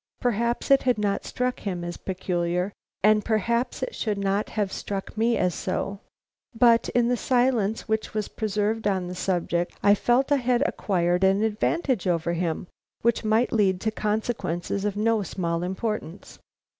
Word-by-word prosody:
Perhaps 235 +2 0
it 275 - +7
had 250 -2 +2
not 205 -1 -1
struck 250 0 -2
him 180 -4 -4
as 175 0 -4
peculiar 180 0 -2 0.3
and 215 0 +5
perhaps 235 +3 0
it - - -3
should 210 -3 -2
not 200 +1 0
have 205 -3 -2
struck 195 +1 -5
me 230 +2 +2
so, 195 +3 -3 0.6
but 235 -1 +5
in 240 -1 +4
the 245 - +2
silence 240 -4 +1
which 220 0 -1
was 215 -1 -2
preserved 215 0 -1
on 190 -3 0
the 180 - -5
subject 175 -1 -1
I 205 - +7
felt 245 +7 +2
I 285 - +5
had 250 0 +2
acquired 180 - 0
an 195 +2 +4
advantage 220 - 0
over 170 -1 +1
him, 170 0 -2 0.4
which 235 0 +2
might 220 +3 +2
lead 195 -4 +2
to 220 - 0
consequences 210 -4 -2
of 205 -1 -1
no 225 0 +2
small 170 -2 -2
importance. 190 0 -4
210 Hz, 160 wpm, -25 LUFS, 185-230 Hz, 0.6 s, it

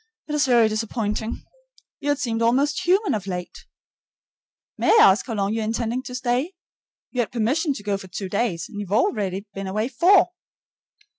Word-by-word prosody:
It's 300 -2 +1
very 240 -3 +5
disappointing. 220 0 -3 0.6
You 290 - -3
had 290 - +2
seemed 230 -5 -2
almost 275 +8 +1
human 390 +3 +3
of 205 -3 -3
late. 180 -2 -6 1.1
May - - 0
I - - +6
ask 195 - -2
how 230 - -3
long 200 0 0
you 225 - -1
are - - -1
intending 230 +3 -2
to 250 -1 -8
stay? 255 +7 -1 0.6
You 250 - -4
had 230 - -3
permission 265 +8 0
to 205 - -9
go 200 -1 -1
for 190 - -10
two 190 +1 -5
days, 190 -5 -1
and 205 - -8
you've 200 -2 -6
already 200 -3 0
been 195 0 -5
away 215 +5 -1
four. 355 +10 +5
230 Hz, 180 wpm, -23 LUFS, 205-260 Hz, 1.1 s, I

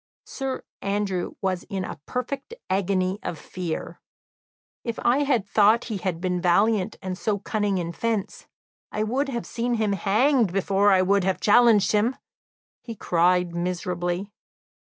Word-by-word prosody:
Sir 270 -2 -4 0.2
Andrew 195 -3 -2
was 185 -2 0
in 190 -2 -4
a - - -7
perfect 275 - -4 0.2
agony 190 0 0
of 165 - -4
fear. 170 +1 -5 0.8
"If 230 -2 -4
I 275 +2 +3
thought 210 +3 +3
he - - -1
had 185 -3 -3
been 180 0 -1
valiant 200 +3 +2
and 185 -1 -3
so 205 +2 -1
cunning 205 -1 -1
in 170 -1 -2
fence, 220 +2 -3 0.4
I 215 - -1
would 265 +6 -1
have 235 -3 -3
seen 240 +1 -1
him 215 -3 +1
hanged 220 +3 +2
before 195 +2 +2
I 185 -1 +5
would 200 +1 +2
have 190 0 0
challenged 220 -1 +5
him!" 215 +5 +2 0.7
he 230 - -7
cried 180 -1 +2
miserably. 175 +2 -2
200 Hz, 145 wpm, -25 LUFS, 185-230 Hz, 0.8 s, I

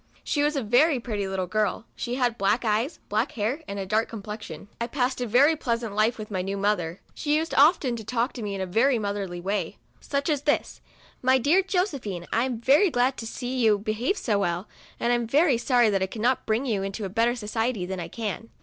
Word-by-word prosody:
She 290 - 0
was 295 +1 +1
a 275 - -1
very 255 +6 +4
pretty 210 -5 -3
little 190 -1 -2
girl. 215 +4 -1
She 240 0 -3
had 245 -3 0
black 205 +5 +1
eyes, 225 +9 0
black 215 +6 0
hair, 235 +8 -1
and 200 - -5
a 195 - -3
dark 215 +4 +1
complexion. 210 -5 -8
I 235 - 0
passed 255 0 -1
a 245 - -1
very 275 +8 +5
pleasant 230 -6 -2
life 215 +3 +2
with 215 -1 -8
my 185 -2 -1
new 195 +2 -3
mother. 195 -4 -1
She 295 0 0
used 325 +1 -2
often 285 -4 +4
to 220 - -7
talk 240 +3 -1
to 245 - -7
me 205 -2 -3
in 195 - -4
a - - -1
very 235 +8 +2
motherly 200 -4 -3
way; 195 0 -2 0.2
such 280 0 -2
as 295 -4 +1
this: 290 0 -1 0.2
" - - -28
My 260 - +6
dear 295 +10 +4
Josephine, 285 - -2
I 230 +2 +2
am 250 -4 -3
very 285 - +4
glad 255 -1 +1
to 225 - -5
see 250 +2 -4
you 220 -3 +4
behave 215 - -1
so 210 - 0
well, 175 0 -1 0.3
and 235 - +1
I - - +4
am 240 -1 -1
very 280 0 +3
sorry 240 -3 +3
that 195 -1 +1
I 190 - +1
cannot 240 +5 -1
bring 225 +4 +1
you 215 -6 0
into 195 +1 -4
better 230 +5 +2
society 225 -2 -2
than 190 0 -4
I 170 - -4
can. 225 +3 -5
230 Hz, 230 wpm, -26 LUFS, 205-260 Hz, 0.3 s, My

